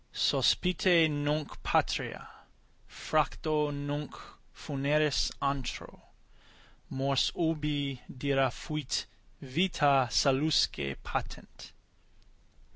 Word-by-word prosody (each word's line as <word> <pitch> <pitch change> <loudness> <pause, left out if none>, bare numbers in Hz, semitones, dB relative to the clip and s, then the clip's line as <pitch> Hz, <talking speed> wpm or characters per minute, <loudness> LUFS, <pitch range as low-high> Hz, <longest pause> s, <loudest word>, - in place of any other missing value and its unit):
Sospite 180 -2 +3
nunc 150 0 -2
patria, - - -1 0.6
fracto 155 0 0
nunc 145 +1 -4 0.4
funeris 145 +1 0
antro, 140 -2 -3 0.9
Mors 135 0 +1
ubi 150 -5 -1
dira 135 0 +1
fuit 150 +2 -4 0.4
vita 140 -3 +2
salusque 135 - +2
patent. - - -6
145 Hz, 65 wpm, -30 LUFS, 135-155 Hz, 0.9 s, Sospite